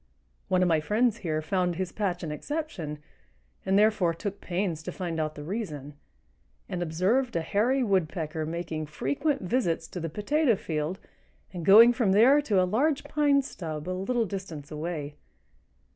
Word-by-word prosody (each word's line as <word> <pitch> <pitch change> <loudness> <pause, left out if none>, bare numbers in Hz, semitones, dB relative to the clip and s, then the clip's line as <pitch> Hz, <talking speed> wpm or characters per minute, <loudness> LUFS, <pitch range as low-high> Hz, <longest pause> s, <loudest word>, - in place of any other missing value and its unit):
One 185 0 +2
of - - +3
my 165 -2 +3
friends 220 +7 +1
here 155 -6 -2
found 180 +1 0
his 185 0 -3
patch 185 -5 -2
an 155 - -3
exception, 175 - -4 0.7
and, 190 +1 +2
therefore, 210 -5 +3
took 200 +4 -5
pains 175 -3 -2
to - - -6
find 170 -3 -4
out 155 -1 -2
the 150 - -7
reason, 150 - -5 0.7
and 180 - -4
observed 190 +10 +1
a 165 - +1
Hairy 240 +10 +1
Woodpecker 165 -6 -1
making 160 -2 -4
frequent 170 - -1
visits 175 -6 0
to 180 - -6
the 165 -1 -3
potato 240 - +1
field 160 0 -3 0.6
and 175 -2 -5
going 225 +7 +8
from 225 -6 +2
there 255 +8 +6
to 210 -9 +1
a 185 - +4
large 275 +10 +1
pine 285 -2 +2
stub 160 - -6
a - - -2
little 225 +6 0
distance 175 -8 -7
away. 150 -2 -5
185 Hz, 165 wpm, -27 LUFS, 160-220 Hz, 0.7 s, going